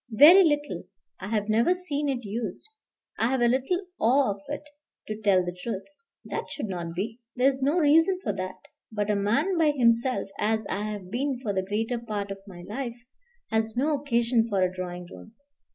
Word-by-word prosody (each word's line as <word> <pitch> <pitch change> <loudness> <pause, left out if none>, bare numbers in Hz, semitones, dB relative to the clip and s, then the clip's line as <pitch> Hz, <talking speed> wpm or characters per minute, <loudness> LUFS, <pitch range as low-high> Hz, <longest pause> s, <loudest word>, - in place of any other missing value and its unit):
"Very 340 - +9
little. 295 -3 0 0.3
I - - -6
have 210 -1 -1
never 230 +11 +3
seen 295 -5 -2
it 250 -4 -2
used. 215 - -4 0.5
I 225 - +3
have 260 -1 0
a 240 - +5
little 270 +10 0
awe 255 0 +4
of 200 0 -7
it, 290 +1 -4 0.4
to 215 - -3
tell 190 -4 +3
the 175 0 -4
truth." 195 +1 -5 0.4
"That - - -4
should 290 - -4
not 170 -4 -5
be. 220 +6 -3 0.2
There 250 +1 +3
is 270 -1 -4
no 285 +6 +2
reason 325 +4 +4
for 205 - -1
that. 185 -1 -5 0.3
But 210 -1 -1
a - - +2
man 280 - +1
by 315 -2 +5
himself, 235 0 +2
as 220 0 +1
I 210 +2 -2
have 195 -3 -7
been 260 +2 -1
for 205 -4 -1
the 190 - +1
greater 225 +5 -2
part 210 -3 -4
of 195 - -6
my 175 -3 -10
life, 235 +4 -5 0.5
has 220 +1 0
no 295 +5 +2
occasion 240 -4 +1
for 195 -3 +2
a 185 0 0
drawing 180 -1 -5
room. 220 +5 -13
230 Hz, 200 wpm, -27 LUFS, 200-275 Hz, 0.5 s, Very